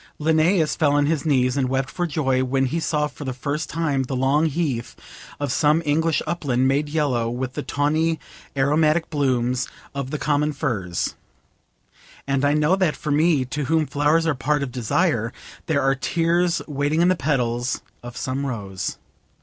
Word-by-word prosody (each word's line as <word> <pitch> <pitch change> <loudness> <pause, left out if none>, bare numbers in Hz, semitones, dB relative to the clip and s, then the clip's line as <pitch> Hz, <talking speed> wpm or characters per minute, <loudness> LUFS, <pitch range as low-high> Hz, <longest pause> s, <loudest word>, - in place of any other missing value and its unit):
Linnaeus 160 +2 +2
fell 145 -3 +2
on 145 0 +3
his 155 0 0
knees 130 -3 +2
and 130 -3 0
wept 135 +1 -1
for 175 -1 -2
joy 135 -5 +1
when 135 +1 +1
he 160 +6 -1
saw 150 -2 0
for 150 - -8
the 130 -2 -4
first 145 +4 -3
time 155 -4 0
the 130 +1 -3
long 140 +5 +2
heath 140 -7 -2 0.4
of 145 -2 -1
some 150 +4 +3
English 160 +2 +1
upland 135 -6 0
made 145 +2 +1
yellow 140 -7 0
with 125 +2 -3
the 150 - -3
tawny 155 +3 0 0.4
aromatic 155 +4 +2
brooms 125 -4 0 0.3
of 140 -2 -4
the 150 - -2
common 150 0 +1
furze; 105 - -2 1.1
and 135 0 0
I 145 +1 +3
know 150 +4 +3
that 185 -6 +1
for 150 - -4
me, 150 -2 +3
to 145 +3 -3
whom 160 +2 +2
flowers 150 +3 +2
are 160 - +2
part 145 +3 0
of 130 - -4
desire, 120 - 0 0.4
there 145 -4 +1
are 135 0 +3
tears 170 +5 +1
waiting 145 +3 +1
in - - +4
the 185 - +3
petals 125 -5 -1 0.2
of 120 0 -9
some 135 +2 -2
rose. 100 -7 -4
145 Hz, 175 wpm, -23 LUFS, 130-155 Hz, 1.1 s, in